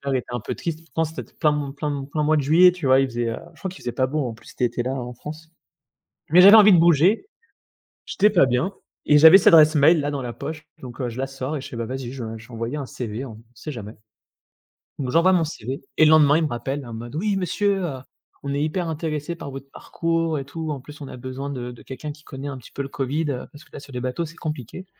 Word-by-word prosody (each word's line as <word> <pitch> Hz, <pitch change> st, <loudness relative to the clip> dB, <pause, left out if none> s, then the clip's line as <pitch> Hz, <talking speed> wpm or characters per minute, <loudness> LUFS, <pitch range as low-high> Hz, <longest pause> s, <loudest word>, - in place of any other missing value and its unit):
était 125 Hz, -, -2 dB
un 120 Hz, -, -2 dB
peu -, -, -4 dB
triste, 160 Hz, -2 st, -4 dB
pourtant 165 Hz, 0 st, -2 dB
c'était 160 Hz, -, -8 dB
plein 150 Hz, -2 st, +3 dB
m 135 Hz, -, -8 dB
plein 150 Hz, +1 st, -3 dB
m 140 Hz, -1 st, -4 dB
plein 150 Hz, -1 st, 0 dB
mois 155 Hz, +1 st, +3 dB
de 150 Hz, -, +2 dB
juillet, 170 Hz, +6 st, +6 dB
tu 170 Hz, -7 st, -4 dB
vois? 130 Hz, +1 st, +6 dB
Il 135 Hz, -, +2 dB
faisait 120 Hz, -1 st, -3 dB
heu, 115 Hz, -, -4 dB, 0.2 s
je -, -, -21 dB
crois 190 Hz, -, -4 dB
qu'il 185 Hz, -, -12 dB
faisait 120 Hz, -, -3 dB
pas 130 Hz, -, +1 dB
beau 145 Hz, -1 st, -1 dB
en 115 Hz, -, -5 dB
plus 110 Hz, -, -17 dB
cet -, -, -12 dB
été 120 Hz, 0 st, 0 dB
là 130 Hz, -, -2 dB
en 125 Hz, -2 st, -5 dB
France, 155 Hz, +5 st, -10 dB, 0.8 s
mais 175 Hz, +4 st, +7 dB
j'avais 200 Hz, +4 st, +10 dB
envie 210 Hz, -2 st, +8 dB
de 175 Hz, -, +6 dB
bouger, 170 Hz, -, +4 dB, 0.8 s
j'étais 210 Hz, +2 st, +3 dB
pas 175 Hz, -9 st, +5 dB
bien 130 Hz, +11 st, 0 dB, 0.3 s
et 150 Hz, -, +5 dB
j'avais 160 Hz, +5 st, +10 dB
cette 195 Hz, -, +1 dB
adresse 155 Hz, -1 st, +7 dB
mail 155 Hz, +3 st, +5 dB
là 145 Hz, -, -1 dB
dans 140 Hz, -, -3 dB
la 120 Hz, -, -5 dB
poche 150 Hz, +4 st, -7 dB, 0.2 s
donc 125 Hz, 0 st, -10 dB
heu, 125 Hz, -, -1 dB
je 115 Hz, -, -9 dB
la 135 Hz, -, -1 dB
sors 135 Hz, +2 st, -5 dB
et -, -, -6 dB
je -, -, -8 dB
fais, 120 Hz, -, -8 dB
bah, 115 Hz, -, -3 dB
vas-y 130 Hz, 0 st, -5 dB
je 130 Hz, -3 st, -6 dB
vais, 110 Hz, 0 st, -6 dB
je 110 Hz, +1 st, -14 dB
vais 125 Hz, -, -14 dB
envoyer 115 Hz, +5 st, -4 dB
un 140 Hz, -, -4 dB
CV, 120 Hz, 0 st, -5 dB
on 110 Hz, -3 st, -10 dB
sait 120 Hz, +6 st, -8 dB
jamais, 110 Hz, -5 st, -8 dB, 1.0 s
donc 130 Hz, -3 st, -2 dB
j'envoie 175 Hz, +3 st, +4 dB
mon 175 Hz, -3 st, +3 dB
CV 135 Hz, -4 st, -5 dB, 0.2 s
et 155 Hz, -, +6 dB
le 155 Hz, -, +5 dB
lendemain 150 Hz, -1 st, +6 dB
il 165 Hz, -, +1 dB
me -, -, +1 dB
rappelle 135 Hz, +2 st, -4 dB
en 120 Hz, -, -9 dB
mode: 120 Hz, +4 st, -8 dB
«Oui 200 Hz, +5 st, 0 dB
monsieur, 195 Hz, +1 st, 0 dB
heu, 140 Hz, -6 st, -4 dB, 0.4 s
on 140 Hz, -, -4 dB
est 140 Hz, -, -1 dB
hyper 170 Hz, +3 st, -2 dB
intéressé 160 Hz, 0 st, -3 dB
par 145 Hz, -4 st, -8 dB
votre 135 Hz, +1 st, -9 dB
parcours 165 Hz, 0 st, -2 dB
et 135 Hz, -, -6 dB
tout 160 Hz, +2 st, -5 dB
en 145 Hz, -, -4 dB
plus 150 Hz, +3 st, -13 dB
on 140 Hz, -, -7 dB
a -, -, -9 dB
besoin 130 Hz, +2 st, -6 dB
de 125 Hz, -2 st, -5 dB
de 120 Hz, -, -13 dB
quelqu'un 150 Hz, +3 st, -7 dB
qui 150 Hz, 0 st, -19 dB
connaît 135 Hz, 0 st, -8 dB
un 140 Hz, -2 st, -5 dB
petit 125 Hz, -, -14 dB
peu 140 Hz, -, -5 dB
le 135 Hz, -, -4 dB
covid, 145 Hz, +3 st, -2 dB
heu, 125 Hz, -, -5 dB
parce 145 Hz, -, -14 dB
que -, -, -25 dB
là -, -, -7 dB
sur 140 Hz, -, -14 dB
les 125 Hz, -, -3 dB
bateaux 125 Hz, +7 st, -3 dB
c'est 165 Hz, +1 st, -12 dB
compliqué. 155 Hz, +3 st, -6 dB
145 Hz, 280 wpm, -23 LUFS, 130-160 Hz, 1.0 s, j'avais